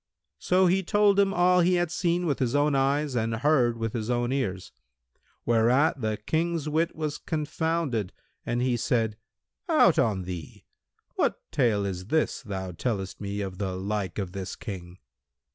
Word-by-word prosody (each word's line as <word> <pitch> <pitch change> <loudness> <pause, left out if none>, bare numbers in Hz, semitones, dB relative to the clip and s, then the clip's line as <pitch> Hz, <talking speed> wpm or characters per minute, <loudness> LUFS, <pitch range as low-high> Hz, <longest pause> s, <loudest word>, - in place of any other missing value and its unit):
So 185 +1 +3
he 185 +2 +3
told 200 +1 +3
him 200 -1 +4
all 180 0 +4
he 180 +1 +4
had 175 -2 0
seen 175 0 0
with 145 -4 0
his 130 0 0
own 145 +1 +3
eyes 140 +1 +1
and 115 -1 0
heard 125 -2 +2
with 115 -1 -3
his 110 -1 -3
own 120 0 0
ears; 100 -9 -2 0.7
whereat 125 +5 +3
the 110 -1 -1
King's 160 +7 -1
wit 160 +3 0
was 155 -2 -3
confounded 155 - -2 0.3
and 120 +1 -1
he 125 -2 +1
said, 110 -2 0 0.5
"Out - - +5
on 100 -5 +1
thee! 90 -5 -8 0.5
What - - +2 0.2
tale 110 -6 +2
is 95 -1 -4
this 160 +5 0
thou 95 -6 -5
tellest 95 0 -3
me 100 0 -3
of 95 -1 -5
the 95 -2 -2
like 100 +1 -3
of 95 -4 -3
this 95 -1 -5
King?" 90 -4 -8
120 Hz, 165 wpm, -27 LUFS, 100-160 Hz, 0.7 s, Out